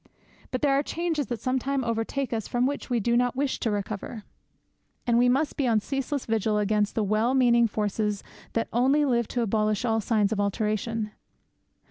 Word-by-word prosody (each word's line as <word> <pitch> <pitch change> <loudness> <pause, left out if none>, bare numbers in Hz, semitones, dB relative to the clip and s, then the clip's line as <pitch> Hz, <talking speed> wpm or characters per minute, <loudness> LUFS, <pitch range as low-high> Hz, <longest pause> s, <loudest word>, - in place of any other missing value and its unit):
But 255 +1 -3
there 280 -2 +4
are 275 - +3
changes 320 -2 -2
that 240 -2 -3
sometimes 260 +1 0
overtake 230 +3 -2
us 220 -2 -2
from 245 +1 +1
which 280 +1 -3
we 245 -2 +1
do 235 +3 +1
not 245 0 +2
wish 275 0 -1
to 230 - 0
recover; 205 +1 -4 0.8
and 235 - +2
we 245 0 +4
must 280 +4 +1
be 275 - +1
on 225 -2 +3
ceaseless 270 +4 -3
vigil 220 -1 +1
against 210 0 +1
the 220 - +1
well 215 +5 +1
meaning 240 -2 +5
forces 210 -1 -1 0.3
that 230 - 0
only 270 +5 +3
live 235 -4 +1
to 245 - -1
abolish 215 0 0
all 225 -1 +1
signs 210 -2 +1
of 215 - -1
alteration. 215 +2 -1
235 Hz, 185 wpm, -26 LUFS, 215-260 Hz, 0.8 s, meaning